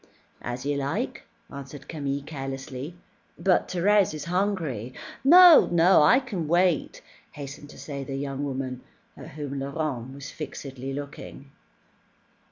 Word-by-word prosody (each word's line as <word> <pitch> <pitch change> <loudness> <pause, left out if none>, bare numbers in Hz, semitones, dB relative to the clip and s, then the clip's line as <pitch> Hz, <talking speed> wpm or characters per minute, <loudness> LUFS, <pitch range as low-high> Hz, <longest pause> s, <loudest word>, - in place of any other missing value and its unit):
"As 120 +2 -5
you 145 0 0
like," 140 0 -3 0.3
answered 140 0 -9
Camille 140 -3 -3
carelessly. 135 +1 -6 0.4
"But 190 -2 +2
Thérèse 190 -1 +2
is 155 - -6
hungry." 165 - -2 0.3
"No, 345 +3 +9
no, 175 +1 +5
I 250 - +6
can 205 - -4
wait," 175 -1 +1 0.3
hastened 145 +1 -9
to - - -13
say 140 -2 -6
the 135 0 -5
young 135 0 -3
woman, 130 -2 -4 0.3
at - - -10
whom 140 -2 -5
Laurent 135 -2 -4
was 140 -1 -8
fixedly 135 -3 -7
looking. 140 0 -8
145 Hz, 130 wpm, -26 LUFS, 135-170 Hz, 0.4 s, No